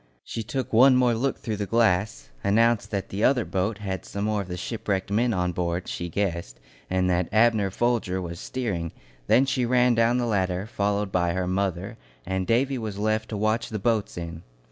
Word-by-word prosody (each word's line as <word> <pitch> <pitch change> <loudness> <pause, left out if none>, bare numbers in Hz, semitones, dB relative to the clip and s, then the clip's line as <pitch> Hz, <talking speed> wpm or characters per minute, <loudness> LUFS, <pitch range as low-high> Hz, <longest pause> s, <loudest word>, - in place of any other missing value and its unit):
She 115 - -5
took 115 +4 -4
one 130 +4 +7
more 125 -1 +4
look 130 +4 -1
through 110 -2 -4
the 100 0 -3
glass, 95 - +1
announced 115 +2 +3
that 100 -2 -3
the 100 +3 -3
other 125 -3 +3
boat 100 +3 -1
had 95 -3 -4
some 100 +1 -4
more 105 -1 0
of 95 - -7
the 90 -1 -5
shipwrecked 100 -1 -3
men 115 +4 +2
on 90 -3 0
board, 85 +1 -2
she 85 - -4
guessed, 85 -9 -2 0.3
and 95 0 +1
that 90 -1 +1
Abner 110 -2 +3
Folger 110 -3 0
was 85 -2 -6
steering; 95 -11 -3 0.3
then 130 - +5
she 130 -1 0
ran 125 0 +3
down 115 +1 +3
the 125 - 0
ladder, 95 -4 0
followed 100 -2 -1
by 90 -2 +1
her 95 0 -1
mother, 95 0 -2 0.3
and 95 0 -2
Davy 130 +4 +2
was 110 -3 -5
left 110 +1 0
to 105 - -3
watch 110 +2 0
the 110 - -3
boats 110 -1 0
in. 85 -1 -6
105 Hz, 200 wpm, -25 LUFS, 90-115 Hz, 0.3 s, one